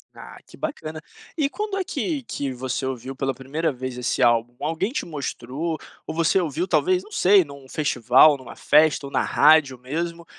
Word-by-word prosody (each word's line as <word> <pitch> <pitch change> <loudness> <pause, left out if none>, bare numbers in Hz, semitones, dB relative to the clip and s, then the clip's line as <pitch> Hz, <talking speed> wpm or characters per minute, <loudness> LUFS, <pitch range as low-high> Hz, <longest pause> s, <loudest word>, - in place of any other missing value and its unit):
Ah, - - -11
que - - -16
bacana. 160 - -5 0.4
E 285 -2 +1
quando 420 +1 -4
é 385 - 0
que 315 -5 -3
que 140 - -4
você 130 +1 -3
ouviu 130 0 -5
pela 135 0 -1
primeira 140 +5 -2
vez 130 -1 -6
esse 125 +1 0
álbum, 120 0 +2
alguém 165 +8 -1
te 300 +3 -3
mostrou 150 +1 -4 0.3
ou - - -6
você 165 +3 +3
ouviu 170 +1 -2
talvez 370 - +2
não 425 - -17
sei 195 - +5
num 140 -2 -13
festival, 140 +1 +4
numa 130 -2 -11
festa 150 -1 +3
ou 140 - -8
na - - +1
rádio 145 -3 +4
mesmo, 170 +6 -4
150 Hz, 185 wpm, -23 LUFS, 130-170 Hz, 0.4 s, sei